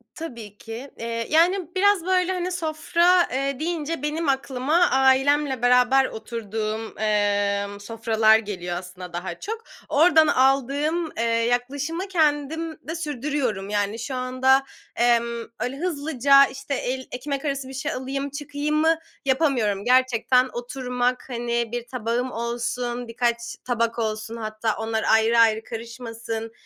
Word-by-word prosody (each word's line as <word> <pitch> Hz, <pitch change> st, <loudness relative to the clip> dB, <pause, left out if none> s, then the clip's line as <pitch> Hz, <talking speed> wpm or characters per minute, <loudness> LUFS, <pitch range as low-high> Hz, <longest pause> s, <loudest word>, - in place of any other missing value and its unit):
Tabii 235 Hz, -10 st, -8 dB
ki, 235 Hz, +6 st, -8 dB
eee, 230 Hz, 0 st, -3 dB
yani, 350 Hz, +2 st, +2 dB
biraz 395 Hz, -2 st, +3 dB
böyle, 370 Hz, 0 st, +2 dB
hani, 365 Hz, 0 st, -2 dB
sofra, 345 Hz, +1 st, +2 dB
eee, 275 Hz, +1 st, -1 dB
deyince 325 Hz, -2 st, -2 dB
benim 305 Hz, +1 st, -1 dB
aklıma 270 Hz, +2 st, 0 dB
ailemle 265 Hz, +1 st, +3 dB
beraber 250 Hz, +2 st, +5 dB
oturduğum, 220 Hz, -1 st, -5 dB
eee, 205 Hz, -1 st, +1 dB
sofralar 220 Hz, 0 st, +3 dB
geliyor 180 Hz, -5 st, -4 dB
aslında 180 Hz, 0 st, -9 dB
daha 175 Hz, 0 st, -5 dB
çok. 445 Hz, +2 st, -5 dB, 0.3 s
Oradan 315 Hz, +1 st, +5 dB
aldığım, 285 Hz, +5 st, +2 dB
eee, 230 Hz, -, 0 dB
yaklaşımı 245 Hz, +9 st, -1 dB
kendim 315 Hz, -2 st, 0 dB
de 325 Hz, -, -3 dB
sürdürüyorum. 280 Hz, -, -2 dB
Yani, 205 Hz, +1 st, -1 dB
şu 260 Hz, +3 st, -4 dB
anda, 255 Hz, +1 st, +2 dB, 0.3 s
emm, 235 Hz, -1 st, +2 dB, 0.2 s
öyle 250 Hz, +4 st, -3 dB
hızlıca, 280 Hz, -4 st, +4 dB
işte, 275 Hz, +1 st, -6 dB
el 260 Hz, 0 st, -3 dB
ekmek 275 Hz, +3 st, -4 dB
arası 275 Hz, -2 st, -2 dB
bir 265 Hz, -, -9 dB
şey 270 Hz, -, -3 dB
alayım, 275 Hz, +2 st, -3 dB
çıkayımı 295 Hz, +3 st, 0 dB, 0.3 s
yapamıyorum. 255 Hz, -8 st, +1 dB
Gerçekten 255 Hz, 0 st, +3 dB
oturmak, 250 Hz, 0 st, -2 dB
hani, 235 Hz, -1 st, -2 dB
bir 240 Hz, 0 st, -4 dB
tabağım 245 Hz, +1 st, -2 dB
olsun, 240 Hz, +1 st, -3 dB
birkaç 235 Hz, 0 st, 0 dB, 0.3 s
tabak 230 Hz, -1 st, 0 dB
olsun, 220 Hz, 0 st, -3 dB
hatta, 215 Hz, 0 st, -2 dB
onlar 225 Hz, 0 st, -2 dB
ayrı, 225 Hz, +1 st, +4 dB
ayrı 225 Hz, -1 st, +4 dB
karışmasın, 230 Hz, -1 st, -6 dB
255 Hz, 130 wpm, -24 LUFS, 230-290 Hz, 0.3 s, beraber